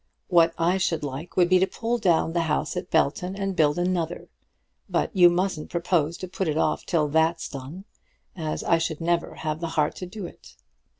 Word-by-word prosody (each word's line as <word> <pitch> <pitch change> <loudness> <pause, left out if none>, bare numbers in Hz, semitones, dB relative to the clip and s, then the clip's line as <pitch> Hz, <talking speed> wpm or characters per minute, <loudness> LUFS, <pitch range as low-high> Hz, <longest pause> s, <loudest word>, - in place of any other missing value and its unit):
What 165 -2 +4
I 175 +3 +2
should 165 -4 0
like 145 +4 -6
would 180 -1 +5
be 185 +1 +4
to 190 - +3
pull 235 +5 -2
down 165 -4 +2
the 170 - +1
house 150 - -1
at - - -4
Belton 170 +4 +1
and 195 -1 -2
build 150 -2 +3
another. 175 -2 -2 0.6
But - - -1
you 175 -2 +8
mustn't 175 -2 -1
propose 170 -2 0
to 185 - -6
put 180 +1 -3
it 155 0 0
off 155 - 0
till 155 -3 +2
that's 160 +2 +1
done, 140 +8 -8 0.5
as 155 -4 -3
I 165 - +3
should 165 -2 -2
never 170 0 -1
have 155 0 -3
the 170 - -3
heart 150 -1 +2
to 185 - -6
do 195 +1 -7
it. - - -13
170 Hz, 200 wpm, -25 LUFS, 160-180 Hz, 0.6 s, you